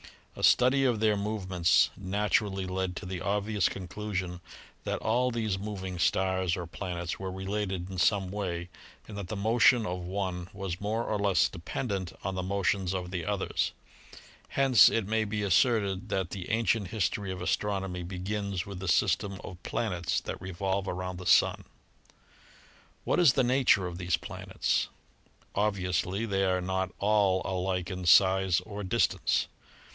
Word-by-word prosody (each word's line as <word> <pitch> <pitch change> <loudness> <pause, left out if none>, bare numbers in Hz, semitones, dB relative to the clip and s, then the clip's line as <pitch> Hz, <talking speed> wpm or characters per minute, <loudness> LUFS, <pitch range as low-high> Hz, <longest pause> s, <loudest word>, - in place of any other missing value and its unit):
A - - -8
study 130 +2 +5
of 120 -4 +2
their 110 -1 +3
movements 95 -4 +2
naturally 100 0 0
led 95 0 -2
to 100 - -6
the 90 -1 -5
obvious 105 -1 +1
conclusion 95 -2 -5 0.4
that - - -2
all 125 +3 +1
these 110 -5 -1
mov 100 -1 -5
ing 90 -2 -5
stars 95 0 +1
or 90 - -4
planets 85 0 -5
were 95 -1 -4
related 95 -1 -3
in 95 - -4
some 95 0 +2
way 90 -4 -3 0.4
and 105 - -9
that 100 -3 -5
the 110 - -4
motion 115 +3 +4
of 90 -2 -3
one 90 -1 -3
was 95 -2 -5
more 110 +3 -1
or 105 -2 -2
less 95 -4 +3
dependent 95 +1 -4
on 95 - -2
the 95 - -2
motions 95 0 0
of 90 -1 -4
the 90 -2 -3
others. 100 -2 -1 0.7
Hence 135 -6 +6
it 115 -3 0
may 110 +1 0
be 105 0 -2
asserted 100 -1 +2
that 95 -2 -1
the 95 -3 -6
ancient 110 -2 +1
history 100 0 -1
of 95 - -5
astronomy 95 -1 -1
begins 95 +2 -3
with 100 -2 -7
the 95 - -5
system 95 +2 +1
of 90 -1 -9
planets 90 -7 -1
that - - -6
revolve 95 +1 -2
around 90 0 -4
the 90 - -6
Sun. - - +4 1.4
What - - +1
is 165 -8 +6
the 130 - +2
nature 125 -6 +3
of 90 0 -5
these 90 -1 +1
planets? - - -2 0.7
Obviously 95 -1 0
they 95 -3 +1
are 90 -1 +1
not 95 0 -1
all 100 -2 +2
alike 95 0 -2
in 90 -1 -5
size 95 0 +5
or 105 -1 -7
distance. 95 - +1
95 Hz, 160 wpm, -29 LUFS, 90-105 Hz, 1.4 s, Hence